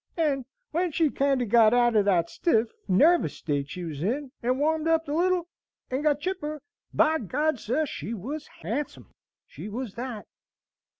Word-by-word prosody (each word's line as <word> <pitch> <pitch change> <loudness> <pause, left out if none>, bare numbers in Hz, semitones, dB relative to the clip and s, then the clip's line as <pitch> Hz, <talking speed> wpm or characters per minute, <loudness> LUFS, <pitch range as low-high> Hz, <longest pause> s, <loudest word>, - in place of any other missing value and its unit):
And 285 -6 +1 0.3
when 345 +2 0
she 310 -1 +2
kinder 275 -2 +1
got 225 +1 +5
out 240 -1 +3
o' 210 - +6
that 180 -4 +2
stiff, 225 - +1 0.2
narvous 300 - +4
state 145 -3 -2
she 180 +5 -6
was 155 -4 -5
in, 255 - -2
and 250 +2 0
warmed 315 +2 +1
up 325 -1 +2
a - - -4
little, 350 +2 +1 0.4
and 260 +2 0
got 295 -1 +2
chipper, 305 -5 -3 0.3
by 320 +1 +3
G 210 - -7
d, 300 +4 +1
sir, 260 +8 0
she 235 -4 -5
was 280 - -6 0.2
handsome, 275 +7 -4 0.3
she 210 - -9
was 230 -1 -5
that!" 235 -3 -6
270 Hz, 175 wpm, -27 LUFS, 220-310 Hz, 0.4 s, o